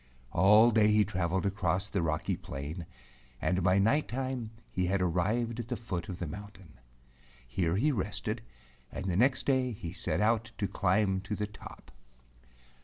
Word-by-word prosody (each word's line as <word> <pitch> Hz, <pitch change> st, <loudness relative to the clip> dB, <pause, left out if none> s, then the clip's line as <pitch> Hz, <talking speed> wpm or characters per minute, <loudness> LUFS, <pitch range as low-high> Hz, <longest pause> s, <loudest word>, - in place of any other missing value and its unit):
All 105 Hz, +6 st, +6 dB
day 110 Hz, -1 st, +4 dB
he 105 Hz, -1 st, +4 dB
traveled 95 Hz, -1 st, -1 dB
across 95 Hz, -1 st, 0 dB
the 100 Hz, -3 st, -1 dB
rocky 80 Hz, -2 st, 0 dB
plain, 75 Hz, +5 st, -6 dB, 0.5 s
and 90 Hz, +6 st, +1 dB
by 90 Hz, +1 st, +3 dB
night 115 Hz, +10 st, +3 dB
time 130 Hz, -2 st, -3 dB, 0.2 s
he 90 Hz, -1 st, 0 dB
had 95 Hz, +2 st, +1 dB
arrived 105 Hz, +7 st, 0 dB
at 115 Hz, -, -4 dB
the 125 Hz, -1 st, -3 dB
foot 90 Hz, -8 st, -4 dB
of 90 Hz, -, -4 dB
the 90 Hz, -, -3 dB
mountain. 95 Hz, -, -10 dB, 0.7 s
Here 85 Hz, +5 st, 0 dB
he 145 Hz, +10 st, +3 dB
rested, 110 Hz, 0 st, -2 dB, 0.5 s
and -, -, -5 dB
the 90 Hz, -2 st, 0 dB
next 130 Hz, +6 st, +3 dB
day 130 Hz, -3 st, +2 dB
he 85 Hz, -5 st, -7 dB
set -, -, -1 dB
out 110 Hz, +1 st, +1 dB
to 100 Hz, -, 0 dB
climb 95 Hz, 0 st, +1 dB
to 100 Hz, +2 st, -4 dB
the 105 Hz, -, -2 dB
top. 105 Hz, 0 st, -12 dB
100 Hz, 170 wpm, -31 LUFS, 90-110 Hz, 0.7 s, All